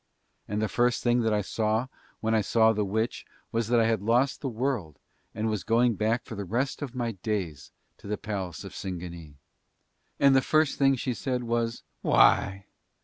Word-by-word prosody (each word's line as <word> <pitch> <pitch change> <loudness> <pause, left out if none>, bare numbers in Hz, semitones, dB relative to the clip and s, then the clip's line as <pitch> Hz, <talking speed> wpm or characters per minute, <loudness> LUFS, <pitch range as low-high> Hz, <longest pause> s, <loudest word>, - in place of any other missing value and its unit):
And 105 +1 -1
the - - +1
first 120 +4 +1
thing 120 0 +3
that 110 -1 +1
I 105 -1 +1
saw 110 +4 0 0.4
when 110 0 0
I 110 - +4
saw 110 +2 +4
the 105 -1 0
witch 110 +4 -2 0.3
was 115 -1 0
that 120 0 +3
I 115 - +4
had 110 -3 +1
lost 120 +6 +2
the 135 - -2
world 115 - -2 0.4
and 110 +1 -1
was 105 -3 -1
going 120 +1 +3
back 110 +3 0
for - - -8
the 100 -2 -4
rest 120 - -2
of 135 -3 -5
my 120 -2 -1
days 95 - -4 0.3
to - - -12
the 105 +1 -2
palace 95 -6 -5
of - - -9
Singanee. 85 -5 -7 0.8
And 140 -1 +6
the 135 - +5
first 155 +2 +2
thing 135 -1 +5
that - - -1
she 125 - -1
said 125 +4 -2
was: 115 0 -1 0.2
"Why! 95 0 +4
110 Hz, 200 wpm, -27 LUFS, 100-120 Hz, 0.8 s, And